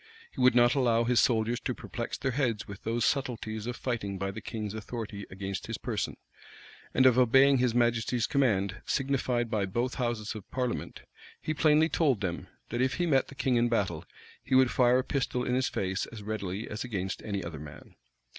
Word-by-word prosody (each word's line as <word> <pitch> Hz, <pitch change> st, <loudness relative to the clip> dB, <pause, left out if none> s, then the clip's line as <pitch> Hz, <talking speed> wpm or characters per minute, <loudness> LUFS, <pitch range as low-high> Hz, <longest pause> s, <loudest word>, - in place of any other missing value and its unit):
He -, -, -5 dB
would 125 Hz, -1 st, +5 dB
not 120 Hz, 0 st, +5 dB
allow 120 Hz, -4 st, +3 dB
his 120 Hz, 0 st, +3 dB
soldiers 115 Hz, 0 st, +2 dB
to -, -, -3 dB
perplex -, -, -5 dB
their 135 Hz, -, -1 dB
heads 120 Hz, -5 st, -1 dB
with 100 Hz, 0 st, -9 dB
those 115 Hz, +1 st, 0 dB
subtleties 115 Hz, -5 st, -2 dB
of 125 Hz, -, -3 dB
fighting 110 Hz, -7 st, -3 dB
by 95 Hz, +1 st, -2 dB
the 110 Hz, -, -8 dB
king's 105 Hz, -1 st, -5 dB
authority 110 Hz, -2 st, -6 dB
against 95 Hz, 0 st, -5 dB
his -, -, -3 dB
person, -, -, -3 dB, 0.7 s
and 130 Hz, -, +3 dB
of 130 Hz, -1 st, +6 dB
obeying 135 Hz, +2 st, +5 dB
his 125 Hz, -2 st, +1 dB
majesty's 120 Hz, 0 st, +2 dB
commands 110 Hz, -, +1 dB
signified 130 Hz, -4 st, 0 dB
by 105 Hz, -3 st, 0 dB
both 120 Hz, +6 st, -1 dB
houses 120 Hz, -3 st, -2 dB
of 110 Hz, -4 st, -10 dB
parliament: 125 Hz, -2 st, -3 dB, 0.4 s
he 155 Hz, -, -2 dB
plainly 155 Hz, +1 st, +4 dB
told 140 Hz, -, +1 dB
them, 90 Hz, -4 st, -3 dB, 0.2 s
that 120 Hz, +2 st, -1 dB
if 130 Hz, 0 st, +1 dB
he 175 Hz, -, 0 dB
met 135 Hz, -5 st, +2 dB
the 140 Hz, -, -12 dB
king 130 Hz, -2 st, +1 dB
in 120 Hz, 0 st, +3 dB
battle, 95 Hz, -8 st, 0 dB, 0.4 s
he 130 Hz, -, 0 dB
would 130 Hz, -1 st, +5 dB
fire 125 Hz, 0 st, +4 dB
a 130 Hz, -, +1 dB
pistol 130 Hz, -2 st, -1 dB
in 125 Hz, -, -1 dB
his 130 Hz, +1 st, +1 dB
face 95 Hz, 0 st, -2 dB
as 110 Hz, -3 st, -10 dB
readily 100 Hz, -1 st, -4 dB
as 110 Hz, -, -4 dB
against 95 Hz, -6 st, -3 dB
any 100 Hz, -3 st, -3 dB
other 80 Hz, -3 st, -6 dB
man. 75 Hz, 0 st, -11 dB
120 Hz, 200 wpm, -29 LUFS, 105-130 Hz, 0.7 s, of